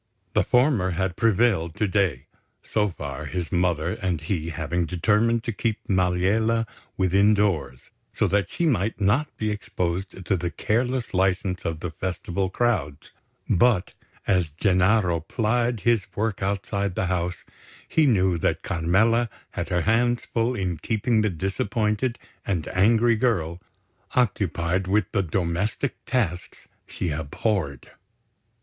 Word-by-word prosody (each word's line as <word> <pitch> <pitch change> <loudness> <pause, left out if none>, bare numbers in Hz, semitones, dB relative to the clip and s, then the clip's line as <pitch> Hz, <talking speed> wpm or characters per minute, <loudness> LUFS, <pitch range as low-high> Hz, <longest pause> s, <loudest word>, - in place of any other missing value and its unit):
The - - +3
former 125 -7 +3
had 95 -2 -1
prevailed 105 -6 +2
to 105 - 0
day, 95 -10 0 0.4
so 105 -1 +1
far, 70 -6 -6
his 90 -3 -4
mother 85 -2 +1
and 90 -4 0
he 80 0 -3
having 85 +1 -2
determined 110 +6 +2
to 115 - -2
keep 110 +1 -1
Maliella 100 +5 +2 0.3
within 100 +3 +4
doors, 95 -10 -1 0.2
so - - 0
that 100 -4 +1
she 170 - -1
might 110 - +1
not 110 +10 +2
be 110 -1 -1
exposed 95 -2 -3
to 100 - +2
the 85 -1 -2
careless 120 - -1
licence 95 -1 0
of 80 -2 -3
the 90 - -4
Festival 95 +2 -3
crowds; 95 -10 -1 0.4
but 110 -1 +3 0.3
as 90 -4 +2
Gennaro 95 -2 +3
plied 115 +5 0
his 115 -5 +2
work 105 -1 -1
outside 100 0 -1
the 95 - 0
house, 90 -1 -2 0.4
he 155 -2 +3
knew 95 -7 +3
that - - 0
Carmela 110 +8 +2 0.2
had - - -4
her 90 -1 +1
hands 120 +5 +2
full 115 +2 0
in 90 -6 -2
keeping 110 +4 +1
the 105 - +2
disappointed 105 +6 -1 0.3
and 85 -6 -2
angry 115 +5 +4
girl 90 -8 0 0.5
occupied 95 -6 +1
with 100 -1 +1
the 100 - +2
domestic 95 - -1
tasks 95 -10 -2 0.2
she 85 - -3
abhorred. 75 - -2
95 Hz, 135 wpm, -25 LUFS, 90-110 Hz, 0.5 s, within